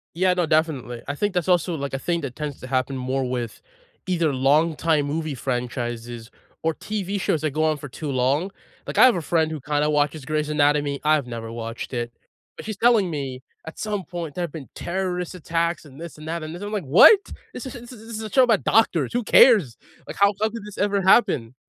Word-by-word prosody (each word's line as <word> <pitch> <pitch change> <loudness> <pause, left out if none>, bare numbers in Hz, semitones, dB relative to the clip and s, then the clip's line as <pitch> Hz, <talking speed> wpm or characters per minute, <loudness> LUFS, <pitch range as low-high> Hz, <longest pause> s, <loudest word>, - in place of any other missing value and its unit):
Yeah, 185 +1 +3
no, 175 -1 +1
definitely. 150 -7 0
I 145 - -3
think 205 +4 -1
that's 180 0 -1
also 175 -1 +2
like 140 -1 -4
a - - -1
thing 170 +3 -1
that 130 -3 -5
tends 150 -2 -5
to 130 - -8
happen 130 +1 -1
more 130 0 -2
with, 120 -2 -4 0.4
either 170 -5 +1
long 150 +5 +3
time 155 -3 +1
movie 155 0 -3
franchises, 120 -2 -4 0.3
or 160 0 0
TV 205 -2 -3
shows 160 - 0
that 155 -3 -1
go 155 +1 0
on 155 -1 +2
for 145 - -8
too 145 +3 -6
long. 135 +8 +1 0.4
Like - - -4
I - - +9
have 250 -6 +6
a 170 - -2
friend 160 0 +1
who 155 -3 -5
kind 145 +2 0
of 150 - +1
watches 145 -1 0
Grey's 150 +1 -1
Anatomy- 145 -1 +1
I've 150 -4 +3
never 115 -1 -6
watched 115 +2 -6
it- 120 0 -3 0.4
but - - -9
she's 215 -2 -4
telling 225 -4 +4
me 135 -4 -5 0.2
at 160 - -9
some 205 -3 -3
point, 170 -4 -6
there 180 - -3
have 170 - -4
been 155 -5 -8
terrorist 180 -1 -3
attacks 170 0 -2
and 140 +1 -14
this 170 -2 -8
and 155 +1 -11
that 165 0 -3
and 155 +2 -6
this. 180 - -8
I'm 205 +1 -5
like, 205 -4 -1
"What? 145 - +8 0.4
This - - -7
is 260 - -7
this 240 +1 -10
is 225 -1 -13
this 230 - -6
is 220 - -5
a 215 - -6
show 260 - +5
about 225 -4 +2
doctors. 175 - +2
Who 245 0 0
cares? 205 - +5 0.3
Like, - - -8
how 200 +1 +4
the 200 - -23
hell 220 0 +1
did 225 -2 -8
this 210 -1 -10
ever 200 0 +1
happen?" 130 - +3
155 Hz, 240 wpm, -23 LUFS, 135-185 Hz, 0.4 s, I